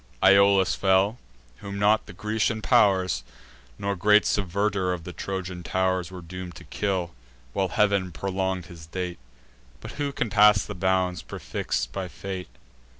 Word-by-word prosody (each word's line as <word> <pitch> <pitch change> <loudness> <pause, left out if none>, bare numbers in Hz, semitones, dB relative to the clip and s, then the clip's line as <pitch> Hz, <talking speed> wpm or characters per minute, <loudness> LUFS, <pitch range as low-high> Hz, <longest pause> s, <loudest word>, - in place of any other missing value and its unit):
Iolas 100 -1 +5
fell, 95 +4 +2 0.4
whom 100 0 -7
not 105 +2 +3
the 100 - -10
Grecian 110 +2 -1
pow'rs, 95 -10 +3 0.5
Nor 100 0 -2
great 105 +3 +4
subverter 100 0 0
of 85 -2 -6
the 90 - -8
Trojan 95 -2 -5
tow'rs, 95 0 0
Were 90 -1 -9
doom'd 90 0 -8
to - - -11
kill, 95 -4 -2 0.4
while 95 - +1
Heav'n 100 -2 +1
prolong'd 95 0 -2
his 80 -2 -12
date; 90 -2 -4 0.6
But - - -8
who 140 -1 0
can 125 -5 -2
pass 105 -1 +6
the 105 - -6
bounds, 95 -1 0
prefix'd - - -3
by 95 -2 -4
fate? 95 +3 -6
95 Hz, 150 wpm, -26 LUFS, 90-100 Hz, 0.6 s, pass